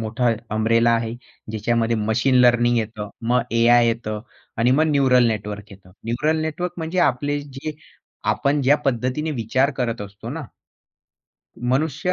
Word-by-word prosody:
मोठा 115 +2 0 0.3
अम्ब्रेला 115 +1 +3
आहे. 115 0 0 0.4
ज्याच्यामध्ये 115 +1 0
मशीन 110 +5 +1
लर्निंग 120 -1 +4
येतं, 110 -1 -4 0.2
मग 125 +1 +3 0.2
एआय 120 0 +5
येतं 115 -2 -2 0.4
आणि 120 +2 +3
मग 145 +5 +4
न्यूरल 130 -4 +4
नेटवर्क 105 -2 -4
येत. 95 -1 -16 0.2
न्यूरल 150 +8 0
नेटवर्क 170 +3 -3
म्हणजे 165 +2 -3
आपले 145 +3 -3
जे 140 +2 -7 0.6
आपण 145 +1 0
ज्या 140 +3 +5
पद्धतीने 130 +4 -1
विचार 130 +1 +1
करत 120 -3 -2
असतो 100 +2 -10
ना. 160 +4 -5 1.3
मनुष्य 155 +5 0
120 Hz, 140 wpm, -22 LUFS, 115-140 Hz, 1.3 s, एआय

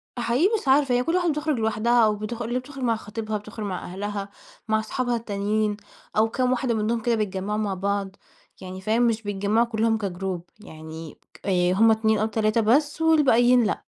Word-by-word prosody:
فحقيقي 245 +9 +2
مش 300 - -12
عارفة، 270 -1 +4
هي 245 - +2
كل 330 +6 0
واحدة 355 -2 +2
بتخرُج 300 -3 -1
لوحدها 225 +2 +2
أو 215 -1 +2
بتخ 215 +3 -5
اللي 240 +2 -1
بتخرُج 270 +1 -9
مع 230 -2 +2
خطبيها، 215 0 -4
بتخرُج 210 +1 -8
مع 185 -3 -4
أهلها، 200 +2 -5 0.4
مع 220 0 +2
اصحابها 245 +2 -2
التانيين 210 -1 -1 0.4
أو 220 +1 +4
كام 255 +2 0
واحدة 255 -1 0
منّهم 225 +1 -1
كده 235 0 +1
بيتجمّعوا 205 -1 -2
مع 205 -2 -1
بعض، 195 0 -2 0.5
يعني 185 0 -8
فاهم، 225 +4 +2
مش 225 -1 0
بيتجمعوا 205 +3 +1
كُلّهم 225 0 +1
كGroup. 190 -2 -3 0.2
يعني 160 -4 -10 0.2
ك - - -16
آآ 180 -2 +2
هم 225 +4 +5
2 220 0 +2
أو 215 - +1
3 220 +1 +1
بس 290 +8 +2
والباقيين 250 -6 +4
لأ، 210 - -1
220 Hz, 190 wpm, -24 LUFS, 205-240 Hz, 0.5 s, هم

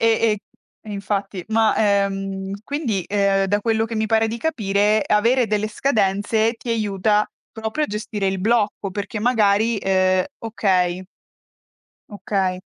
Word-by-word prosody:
E 230 - +3 0.3
e 210 - -2 0.5
e 215 - -9
infatti, 200 -2 -3
ma, 220 0 +3
ehm, 195 -1 0
quindi, 245 - -2
ehm, 200 -1 +2
da 205 +2 +1
quello 225 0 +1
che 225 0 -5
mi 220 0 0
pare 225 +1 +2
di 225 +1 -3
capire, 215 -6 +1
avere 235 +4 +3
delle 210 0 0
scadenze 215 -1 +1
ti 235 +1 -7
aiuta 210 -1 +1 0.3
proprio 220 +7 -2
a - - -3
gestire 210 -1 -3
il 190 -1 -1
blocco, 210 -1 0
perché 205 +2 -4
magari, 220 -1 +2
ehm 185 -1 +2
okay. 185 -5 0 1.1
Okay. 190 -3 -2
210 Hz, 140 wpm, -21 LUFS, 195-225 Hz, 1.1 s, E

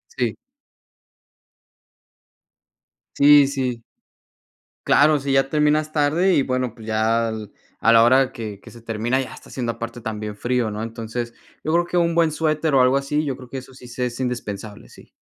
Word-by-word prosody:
Sí. 120 -4 -1 2.8
Sí, 145 -1 +7
sí. 130 -4 -3 1.0
Claro, 150 0 +4
si 135 0 -2
ya 135 0 +2
terminas 150 +1 +1
tarde, 160 +5 +2
y 140 - +3
bueno, 130 -3 -2
pues 110 -2 -13
ya, 110 +1 +1
a 110 +1 -3
la 115 0 +7
hora 130 +2 +4
que 105 -3 -7
que - - -14
se 120 - -14
termina 115 +3 -1
ya 130 - -5
está - - -14
haciendo 120 -3 -3
aparte 115 +1 -7
también 105 -1 -5
frío, 120 -2 -1
¿no? 105 - -5
Entonces, 115 +1 -5 0.3
yo 155 - -1
creo 175 0 +3
que 175 - -2
un 170 -1 +2
buen 165 -2 +3
suéter 155 -1 0
o 130 - +5
algo 125 +1 +4
así, 150 +2 -1
yo 135 -3 -2
creo 125 -1 -13
que 135 - -6
eso 130 0 -10
sí 125 -1 -13
se 125 +1 -3
es 120 0 -5
indispensable, 110 -4 -5
sí. - - -17
125 Hz, 175 wpm, -22 LUFS, 115-145 Hz, 2.8 s, Sí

